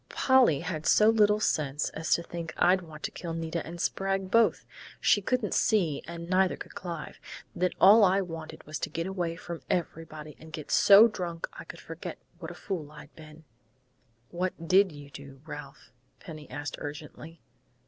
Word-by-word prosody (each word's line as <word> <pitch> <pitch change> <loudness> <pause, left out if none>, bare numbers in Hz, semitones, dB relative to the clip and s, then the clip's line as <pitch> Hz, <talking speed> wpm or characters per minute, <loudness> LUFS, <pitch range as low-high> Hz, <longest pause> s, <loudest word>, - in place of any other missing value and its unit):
Polly 255 - +3
had 155 -3 -4
so 215 +1 +6
little 210 -1 +3
sense 150 -7 0
as 160 0 -5
to 170 - -4
think 170 -2 -7
I'd 185 +1 +4
want 155 -3 -12
to - - -3
kill 165 -2 -6
Nita 165 0 -3
and 170 +2 -9
Sprague 195 +1 -1
both! 230 +1 +3 0.3
She 205 - +3
couldn't 235 0 -1
see, 175 -10 +1
and 170 0 -7
neither 185 +1 +2
could - - -10
Clive, 170 -4 -7 0.4
that 180 +1 0
all 210 +3 +8
I 190 0 +4
wanted 165 -3 -8
was 155 +1 -5
to - - -3
get 165 +1 -3
away 180 -3 -3
from 170 -1 -8
everybody 155 -3 -4
and 160 0 -13
get 155 -2 -7
so 205 +3 +8
drunk 175 -6 -5
I - - -10
could - - -10
forget - - -8 0.2
what - - -7
a - - -9
fool 160 -7 -5
I'd 150 -1 -14
been 155 0 -14 0.5
" 120 -1 -41
"What 180 -2 -3
did 190 +1 +5
you 145 -1 -12
do, 140 -1 -11
Ralph?" 145 -3 -10 0.3
Penny 155 -3 -10
asked 145 0 -5
urgently. 150 +2 -9
165 Hz, 180 wpm, -28 LUFS, 155-190 Hz, 0.5 s, all